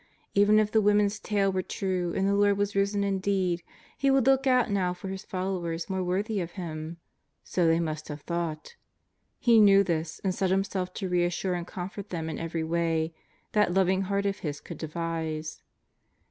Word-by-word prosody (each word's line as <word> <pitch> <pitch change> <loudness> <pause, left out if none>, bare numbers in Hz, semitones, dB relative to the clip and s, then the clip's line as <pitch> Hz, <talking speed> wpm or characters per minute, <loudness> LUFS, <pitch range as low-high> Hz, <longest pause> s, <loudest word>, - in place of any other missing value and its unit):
Even 205 +1 +5
if 215 -1 +3
the 220 - +4
women's 205 0 +3
tale 200 -2 +1
were 185 0 0
true 185 -2 -2
and 195 0 +1
the 200 - +2
Lord 200 0 +3
was 205 0 -1
risen 200 +1 +1
indeed, 190 -3 0 0.3
He 275 - +1
would 270 -2 +4
look 270 0 +4
out 250 -4 +3
now 180 -3 0
for 190 +1 -5
followers 185 -2 -3
more 190 -1 -1
worthy 200 +4 -1
of 175 0 -6
Him. 165 -2 -6 0.5
So 175 -2 +1
they 165 0 +4
must 155 -2 -3
have 150 0 -7
thought. 170 - -4 0.6
He 235 -2 +5
knew 200 -1 +7
this 160 -3 -2
and 190 -2 +1
set 190 0 0
Himself 190 -1 0
to 195 - -3
reassure 180 +1 0
and 175 -1 -4
comfort 190 +2 -6
them 160 -2 -3
in 155 - -5
every 165 0 -3
way 165 0 0 0.4
that 210 -4 +2
loving 190 0 +3
Heart 200 +1 -1
of 200 0 -1
His 145 -3 -4
could - - -9
de 160 - -4
vise. 160 -1 -4
185 Hz, 190 wpm, -28 LUFS, 170-200 Hz, 0.6 s, knew